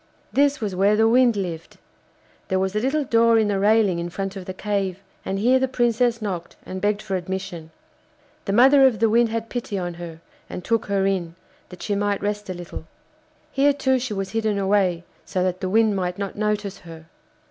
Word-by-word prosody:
This 285 0 +3
was 210 -5 -3
where 200 +3 +3
the 220 +1 +4
Wind 240 0 +4
lived. 170 -4 -5 0.7
There 190 - 0
was 190 +1 -1
a - - +2
little 275 +6 0
door 230 -2 +4
in 215 -2 +2
the 200 -1 0
railing 205 -3 +3
in 170 0 -4
front 195 +2 -4
of 190 -2 -7
the 185 - -5
cave, 195 -2 -2 0.2
and 195 - -3
here 250 +6 +3
the 265 - +1
Princess 240 -2 +1
knocked 180 -5 -4
and 185 0 -6
begged 205 0 0
for 195 -3 -3
admission. 180 -3 -5 0.8
The 195 - -1
mother 265 +4 +7
of 240 -4 0
the 225 +2 +2
Wind 235 +1 +4
had 225 0 -3
pity 230 -5 -4
on 175 -2 -3
her 165 -2 -8 0.3
and 180 - -6
took 230 -2 0
her 200 -1 +1
in, 180 -4 -1 0.3
that 180 -1 -10
she 205 - -1
might 205 0 0
rest 210 0 -3
a 185 - -3
little. 175 -2 -8 0.7
Here 285 +1 +3
too 265 -2 +1
she 240 -4 -4
was 195 -1 -4
hidden 220 -2 0
away, 190 -3 +1 0.2
so 185 - -2
that 185 0 -2
the 185 - -2
Wind 220 0 +3
might 180 -2 -2
not 200 -1 -4
notice 210 -2 -2
her. 165 -2 -12
205 Hz, 210 wpm, -23 LUFS, 185-225 Hz, 0.8 s, mother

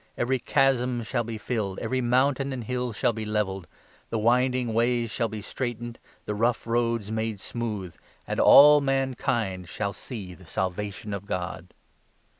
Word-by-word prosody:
Every 130 +2 +1
chasm 125 -3 +2
shall 115 +2 -1
be 115 -1 -5
filled, 105 -4 -3
5 - - -6
Every 130 +3 0
mountain 135 +3 +2
and 130 -3 -4
hill 125 +1 -2
shall 115 +2 +1
be 110 0 -4
levelled, 100 -4 -2 0.4
The 115 - -1
winding 125 +1 +2
ways 120 0 +1
shall 115 0 0
be 110 -1 -7
straightened, 120 0 -4 0.3
The 105 - -2
rough 115 +3 0
roads 115 -2 0
made 110 -2 -2
smooth, 105 -5 -4 0.3
And - - -3
all 150 +1 +9
mankind 120 -9 -1
shall 100 -1 -3
see 100 -8 -7
the 90 -1 -16
Salvation 100 +3 -3
of 100 0 -6
God." 90 -3 -5
115 Hz, 160 wpm, -26 LUFS, 105-125 Hz, 0.4 s, all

